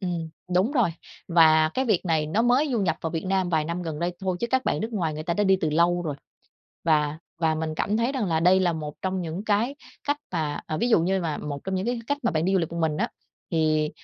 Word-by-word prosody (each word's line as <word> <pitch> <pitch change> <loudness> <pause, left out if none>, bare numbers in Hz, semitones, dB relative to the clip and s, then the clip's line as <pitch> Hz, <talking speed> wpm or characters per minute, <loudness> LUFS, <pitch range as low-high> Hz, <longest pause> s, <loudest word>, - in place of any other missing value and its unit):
ừm, 175 -4 -3 0.3
đúng 190 +9 +3
rồi, 240 - +3 0.4
và 160 -2 +5
cái 260 - +1
việc 215 -8 +1
này 160 -3 +1
nó 200 +9 +1
mới 250 +5 +3
du 235 - +1
nhập 170 -5 +1
vào 165 - -3
Việt 160 0 -3
Nam 190 -1 +1
vài 160 -3 +1
năm 170 +3 -3
gần 160 -3 -4
đây 175 +2 -1
thôi, 185 -2 -1
chứ 235 - 0
các 260 0 +2
bạn - - 0
nước 220 +3 -3
ngoài 170 -7 -1
người 155 - -5
ta 170 +1 -1
đã 205 - +1
đi 190 -1 +5
từ 155 - 0
lâu 170 +3 +2
rồi. 155 -4 -3 0.7
Và 155 -2 +2 0.2
và 160 -1 +2
mình 155 0 -3
cảm 205 +6 0
thấy 235 +4 +1
rằng 255 -7 -1
là 160 -3 +1
đây 180 +3 +5
là 180 -2 +2
một 150 -2 -5
trong 190 0 -1
những 170 +4 -5
cái 220 +6 +1 0.3
cách 290 0 +2 0.2
mà 155 -4 -1
ờ, 155 - -3
ví 240 - +1
dụ 225 - +5
như 190 +3 +1
mà 160 -4 -2
một 145 -1 -4
trong 190 - -2
những 190 +2 -1
cái 245 0 0
cách 285 +3 0
mà 235 - +3
bạn 160 0 0
đi 190 - +1
du 190 - +4
lịch 165 -3 -1
một 170 - -4
mình 160 -2 +1
á, - - 0 0.4
thì 155 -2 +2
175 Hz, 280 wpm, -25 LUFS, 160-200 Hz, 0.7 s, và